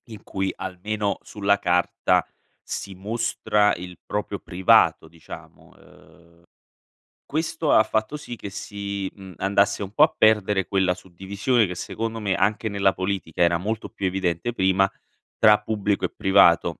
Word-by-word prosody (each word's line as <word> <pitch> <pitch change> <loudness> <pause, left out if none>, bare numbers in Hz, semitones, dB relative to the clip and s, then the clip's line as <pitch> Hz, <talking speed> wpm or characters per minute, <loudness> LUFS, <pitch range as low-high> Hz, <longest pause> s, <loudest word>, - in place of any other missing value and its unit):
in 110 -3 -11
cui, 95 -1 -2
almeno 100 +3 -3
sulla 100 -1 0
carta, 90 0 +1 0.4
si 100 - -6
mostra 105 +1 0
il 90 -1 -9
proprio 105 -1 -3
privato, 90 -4 +3
diciamo, 85 0 -13
ehm, 85 -1 -21 0.8
questo 155 0 -1
ha 110 - +6
fatto 110 +6 -2
sì 135 -5 -8
che 100 - -8
si, 100 -1 -5
mhmm, 95 -2 -11
andasse 100 +1 +1
un 95 - -7
po' 145 - +5
a 155 - +3
perdere 105 -3 +3
quella 95 -2 +1
suddivisione 95 +6 -1
che 90 - -5
secondo 115 +5 -4
me, 100 -3 -1
anche 110 +2 0
nella 100 -1 +2
politica 95 -4 -3
era 85 0 +4
molto 105 +5 -4
più 100 - -5
evidente 95 +4 -1
prima, 95 -2 +2 0.5
tra 105 -1 +6
pubblico 105 -2 -1
e - - -2
privato. 85 -3 +4
100 Hz, 145 wpm, -24 LUFS, 95-105 Hz, 0.8 s, ha